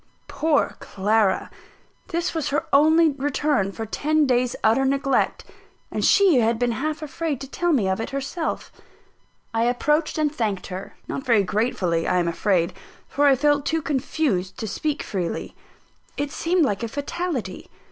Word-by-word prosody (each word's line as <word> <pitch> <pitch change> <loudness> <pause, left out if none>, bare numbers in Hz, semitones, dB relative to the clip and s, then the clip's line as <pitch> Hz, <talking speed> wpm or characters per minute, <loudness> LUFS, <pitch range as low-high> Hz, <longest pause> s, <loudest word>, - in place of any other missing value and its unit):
Poor 310 -2 0
Clara! 205 0 0 0.6
This 345 -1 -2
was 320 -3 -2
her 285 - 0
only 315 +3 +6
return 280 -6 0
for 225 +3 -5
ten 305 +7 +1
days' 250 -2 +1
utter 225 +5 +4
neglect 275 0 +1 0.5
and - - -2
she 380 -10 +5
had 230 0 +2
been 245 0 +1
half 305 +6 -3
afraid 305 -2 -3
to 270 - -7
tell 350 +5 -1
me 235 -11 +2
of 190 +3 0
it - - -4
herself. 275 +5 -4 0.8
I 225 +1 +1
approached 300 +7 +1
and 305 -1 +1
thanked 210 -9 -2
her; 190 +2 -7
not 270 - -4
very 230 -6 +3
gratefully, 185 -5 0
I - - +2
am 175 -1 +1
afraid, 170 0 +1 0.3
for 290 +1 +2
I 275 - +6
felt 290 +1 +2
too 320 +1 -1
confused 265 - -1
to 220 - -4
speak 295 +8 -2
freely. 180 -4 -4 0.6
It 285 0 -2
seemed 335 +1 +1
like 205 -4 -1
a 230 - -2
fatality. 285 - -4
270 Hz, 160 wpm, -23 LUFS, 220-305 Hz, 0.8 s, only